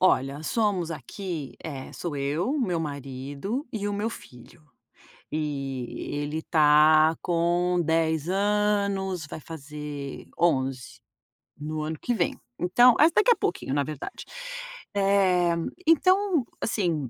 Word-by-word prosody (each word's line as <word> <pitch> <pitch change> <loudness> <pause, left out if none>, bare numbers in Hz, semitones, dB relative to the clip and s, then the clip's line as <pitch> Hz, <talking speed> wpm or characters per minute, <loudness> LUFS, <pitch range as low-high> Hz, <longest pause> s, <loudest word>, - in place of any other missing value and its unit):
Olha, 140 -5 +2
somos 195 -4 0
aqui 160 - -6
eh 140 -5 -7
sou 170 -4 -4
eu, 145 - -1
o 290 0 0
meu 180 -8 0
marido 140 - -4
e 205 -2 -2
o - - -2
meu 210 +3 -1
filho, 125 - -13 0.7
e 135 -5 -3
ele 145 +2 -2
tá 155 0 +5
com 175 +1 +1
10 160 0 +1
anos, 200 -3 +1
vai 155 - -7
fazer 150 -2 -7
11 135 -6 0 0.6
no 155 +1 -4
ano 155 0 -3
que 245 - 0
vem. 230 - -1 0.2
Então 240 +7 +6
mas 320 +2 +6
daqui 430 +7 +4
a 470 - +6
pouquinho, 130 - -2
na 145 0 +2
verdade. 150 -1 -6 0.7
Eh, 190 -3 +3 0.3
então 370 -1 +4 0.2
assim, 170 - 0
165 Hz, 125 wpm, -26 LUFS, 145-200 Hz, 0.7 s, Então